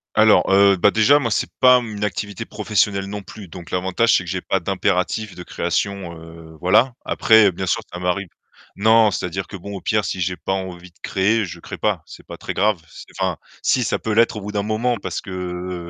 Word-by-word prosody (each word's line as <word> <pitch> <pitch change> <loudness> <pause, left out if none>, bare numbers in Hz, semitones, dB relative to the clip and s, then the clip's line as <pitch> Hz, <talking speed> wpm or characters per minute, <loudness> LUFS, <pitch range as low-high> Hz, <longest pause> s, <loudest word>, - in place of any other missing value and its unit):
Alors 110 0 +5
heu, 100 0 +6
bah 95 +2 +4
déjà 125 +8 +4
moi, 120 - -1
c'est 105 - -1
pas 125 -1 +6
mmh 110 -3 -7
une 105 - -4
activité 100 0 -3
professionnelle 100 -1 0
non 105 +1 -6
plus 100 +1 -11
donc 85 0 -11
l'avantage, 95 +6 +2
c'est - - -3
que 90 - -8
j'ai 95 +1 -2
pas 95 - 0
d'impératif 95 +3 -1
de 90 - -8
création, 90 +1 -2
heu, 80 -1 -13
voilà. 110 - +3
Après, 110 -3 +5
bien 95 +2 -5
sûr, - - +1
ça 90 - -5
varie 90 +2 -1 0.5
non, 110 +1 +4
c'est-à-dire 90 +1 -3
que 100 - -8
bon, 100 +3 -8
au 95 - -7
pire, 105 -2 0
si 90 - -3
j'ai 90 +1 -1
pas 95 +4 -3
envie 90 -2 -5
de 85 - -33
créer, 105 +4 +1
je 85 -1 -9
crée - - -8
pas, - - 0
c'est - - -13
pas - - -9
très - - -5
grave. 105 -1 +1
C'est - - -12
enfin - - 0 0.2
si - - +2
ça - - -1
peut 110 - -2
l'être 115 +1 +3
au - - -5
bout 105 +1 -6
d'un 105 -1 -1
moment, 115 +3 0
parce 100 - -5
que - - -12
heu 90 -1 -5
100 Hz, 230 wpm, -21 LUFS, 90-110 Hz, 0.5 s, heu